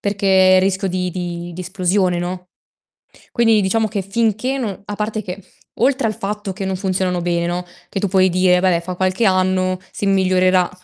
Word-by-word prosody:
Perché 190 -2 +4
rischio 190 +1 0
di 180 0 -2
di 175 -1 -5
di 180 - -7
esplosione, 185 0 0
no, 180 +1 -5 0.9
quindi 225 -2 +4
diciamo 215 +3 +1
che 205 -2 -2
finché 225 +6 -1
no 205 -5 -4
a 205 - -5
parte 215 +1 -3
che 180 +1 -7 0.4
oltre 265 -1 +2
al 215 - -3
fatto 205 -1 -4
che 195 - -6
non 190 -1 -2
funzionano 185 -2 -1
bene, 170 0 0
no, 180 +1 -3 0.2
che 195 - -3
tu 200 - 0
puoi 190 0 +3
dire: 180 0 +3
"Vabbè, 180 -2 +3
fa 180 +2 -6
qualche 185 +4 0
anno 185 -1 +2
si 205 - -4
migliorerà, 185 -2 +3
185 Hz, 185 wpm, -19 LUFS, 180-200 Hz, 0.9 s, Perché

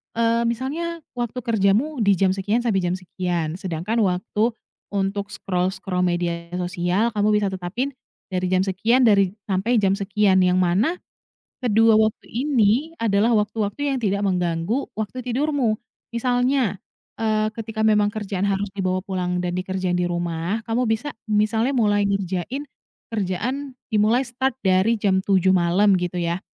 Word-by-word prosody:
eee, 230 0 +2
misalnya 305 +8 -3
waktu 240 0 -3
kerjamu 225 +7 +1
di 200 -3 +4
jam 190 +1 +2
sekian 205 +5 0
sampai 220 -5 +1
jam 175 -1 0
sekian 180 -3 -3
sedangkan 185 +6 -2
waktu 210 +3 0 0.3
untuk 200 0 -2
scroll-scroll 185 -2 -2
media 170 -1 -2
sosial 180 +5 0
kamu 210 0 +2
bisa 205 -2 +1
tetapin 190 +9 -3 0.4
dari 185 0 -1
jam 185 0 +2
sekian 220 +7 +2
dari 200 -4 +4
sampai 200 +5 0
jam 195 -3 +3
sekian, 200 -1 +2
yang 180 0 +3
mana 185 - +2 0.6
kedua 225 -2 +4
waktu 220 0 +1
ini 255 +2 +1
adalah 220 +1 +2
waktu-waktu 215 +6 -1
yang - - -2
tidak 200 -2 0
mengganggu 180 +6 -1
waktu 220 +4 -5
tidurmu. 255 -2 0 0.3
Misalnya, 245 -1 +1 0.5
eee, 215 -1 +1
ketika 225 -1 -6
memang 210 -1 +4
kerjaan 200 -3 -3
harus 200 +1 0
dibawa 185 -1 0
pulang 180 -2 -1
dan 175 0 -2
dikerjain 185 -1 -1
di 180 - +1
rumah, 175 +3 -2
kamu 230 +2 +1
bisa 225 +7 -1 0.2
misalnya 220 +4 +2
mulai 210 -6 +2
ngerjain 195 - -2 0.5
kerjaan 245 +8 -3 0.2
dimulai 220 +5 +3
start 260 +2 -2
dari 190 +5 +3
jam 190 -2 +2
07:00 190 -1 +3
malam 185 +4 +3
gitu 180 0 -2
ya. 170 +1 -1
205 Hz, 145 wpm, -23 LUFS, 185-230 Hz, 0.6 s, di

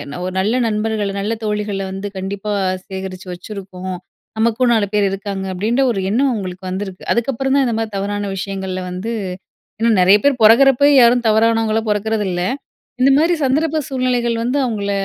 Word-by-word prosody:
அ - - -5
ஒரு 185 - -4
நல்ல 210 +5 +1
நண்பர்கள, 215 -1 -1
நல்ல 210 +3 -1
தோழிகள 210 -2 -2
வந்து 195 +2 -5
கண்டிப்பா 200 +2 -4 0.3
சேகரிச்சு 190 -1 -7
வச்சுருக்கோம். 185 -1 -7 0.4
நமக்கும் 235 +2 +2
4 220 -3 +2
பேர் 205 -1 +3
இருக்காங்க" 195 0 -4
அப்பிடின்ற 225 +8 +1
ஒரு 195 -4 -2
எண்ணம் 265 +6 +2
அவுங்களுக்கு 185 -3 -5
வந்திருக்கு. 190 0 -5
அதுக்கப்புறம் 265 +3 -1
தான் 275 -1 +3
இந்தமாரி 225 -1 -1
தவறான 205 +1 -2
விஷயங்கள்ல 190 -1 -4
வந்து, 185 +6 -4 0.7
இன்னும் 225 -2 +3
நிறைய 190 +3 +6
பேரு 285 -1 +4
பொறக்கிறப்ப 270 +5 +6
யாரும் 240 0 +4
தவறானவங்களா 225 0 +2
பொறக்கிறது 210 +1 0
இல்ல. 175 0 -2 0.6
இந்த 265 - +5
மாதிரி 330 +4 +3
சந்தர்ப்ப 310 +4 +1
சூழ்நிலைகள் 250 -3 0
வந்து 250 +4 0
அவுங்கள 205 -4 -2
215 Hz, 155 wpm, -18 LUFS, 195-235 Hz, 0.7 s, நிறைய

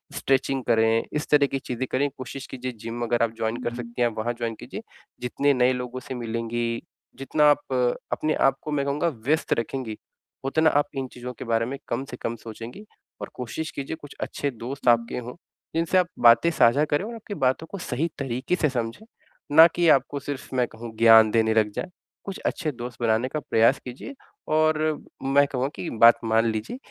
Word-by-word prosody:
Stretching 135 0 0
करें, 115 -1 +3
इस 150 0 -2
तरह 145 -1 +5
की 135 - -3
चीज़ें 130 0 -4
करें। 140 +2 +1
कोशिश 130 +1 -7
कीजिए 130 0 -5
जिम 115 +1 -5
अगर 120 0 +1
आप 115 - +1
जॉइन 110 +1 -1
कर 120 - -2
सकती 120 0 -6
हैं, 120 - +5
आप 110 - -12
वहाँ 120 +2 -1
जॉइन 115 -1 -2
कीजिए। - - -7 0.4
जितने 140 +3 +1
नए 125 0 +3
लोगों 125 0 -5
से 130 - -7
मिलेंगी, 115 0 -2 0.4
जितना 150 +2 +1
आप 145 -2 -2 0.4
अपने 155 0 0 0.2
आपको 135 +3 -7
मैं 140 -1 0
कहूँगा 145 +4 0 0.2
व्यस्त 155 +2 +2
रखेंगी, 115 -2 -4 0.5
उतना 160 +4 +3
आप - - -7
इन 135 -1 -2
चीज़ों 125 0 -7
के - - -6
बारे 115 0 +1
में 135 +3 -5
कम 130 +3 -2
से 125 - -6
कम 115 - -3
सोचेंगी। 115 - -8 0.4
और - - -5
कोशिश 125 +6 -5
कीजिए 140 +3 -5
कुछ 145 - -11
अच्छे 145 - -2
दोस्त 120 - -18
दोस्त 130 +2 -6
आपके 115 +1 -7
हों, 125 0 -6 0.4
जिनसे 165 +3 +2
आप 180 -1 +3
बातें 120 +8 +6
साझा 145 0 +4
करें 150 +7 0
और 235 - -6
आपकी 215 -2 -8
बातों 130 +5 +1
को 200 - -5
सही 165 -2 -2
तरीके 130 +5 -1
से 155 -4 +1
समझें, 120 - -4 0.5
ना 165 +1 +10
कि 170 0 +1
आपको 140 0 +3
सिर्फ़ 135 -1 -6
मैं 125 -2 +2
कहूँ 115 0 -10
ज्ञान 110 -1 +7
देने 110 -1 +3
लग 110 -2 +2
जाएँ। 185 - -5 0.4
कुछ 195 - -5
अच्छे 155 -4 -1
दोस्त 120 -1 -8
बनाने 115 +1 +2
का 155 - -3
प्रयास 115 -1 +3
कीजिए, 125 - -8 0.3
और 155 0 +3 0.5
मैं 140 +1 +4
कहूँगा 130 -1 -1
की 175 - -5
बात 115 0 +8
मान 115 +1 +3
लीजिए 110 - -4
130 Hz, 200 wpm, -25 LUFS, 115-145 Hz, 0.5 s, ना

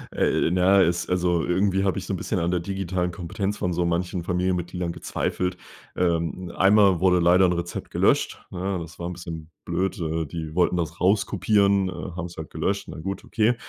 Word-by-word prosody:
Äh, - - +2
na 95 +2 +5
ja, - - +5
es 85 0 -1
also, 90 -2 +1
irgendwie 95 +2 +1
habe 95 -1 +1
ich 95 - -4
so 95 - -3
'n - - -1
bisschen 95 0 -2
an 85 +1 0
der 90 - +1
digitalen 95 -1 -2
Kompetenz 95 +4 -3
von 90 - -1
so 85 0 0
manchen 85 +1 -1
Familienmitgliedern 90 -1 -1
gezweifelt. 90 +2 -2 0.4
Ähm, 85 0 -1
einmal 95 -2 +5
wurde 90 -1 +4
leider 90 +2 +5
'n 90 - +2
Rezept 85 0 -4
gelöscht, - - +1
ne? 95 +1 -2
Das 85 +2 -10
war 85 - -3
'n 90 - -4
bisschen 80 -2 -8 0.2
blöd, 90 +3 -1
äh, 80 0 -1
die 80 +1 -6
wollten 90 0 +3
das 85 -1 -3
rauskopieren, 100 0 +3
äh, - - -4 0.3
haben's 85 0 -5
halt 80 - -6
gelöscht. - - -2
Na - - -7
gut, 95 +4 -4
okay. 115 +2 +1
90 Hz, 195 wpm, -25 LUFS, 85-95 Hz, 0.4 s, na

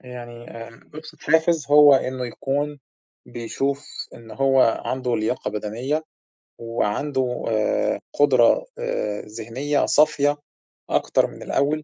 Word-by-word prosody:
آآ 125 - -19
يعني 120 -1 -10
آآ 115 0 -10
أبسط 155 0 -11
حافز 160 -1 +2
هو 145 -1 +8
إنه 130 -1 -1
يكون 145 +4 -3 0.5
بيشوف 135 +4 -3 0.3
إن 115 -1 -13
هو 135 -4 +2
عنده 125 -2 -1
لياقة 110 +3 -2
بدنية 120 +9 -3 0.6
وعنده 125 +3 -2
آآ 110 -1 0 0.2
قدرة 135 - +4
آآ 485 - -2
ذهنية 120 +7 -2
صافية 145 -1 +3 0.5
أكتر - - +2
من - - -11
الأول 150 +2 0
130 Hz, 115 wpm, -23 LUFS, 115-145 Hz, 0.6 s, هو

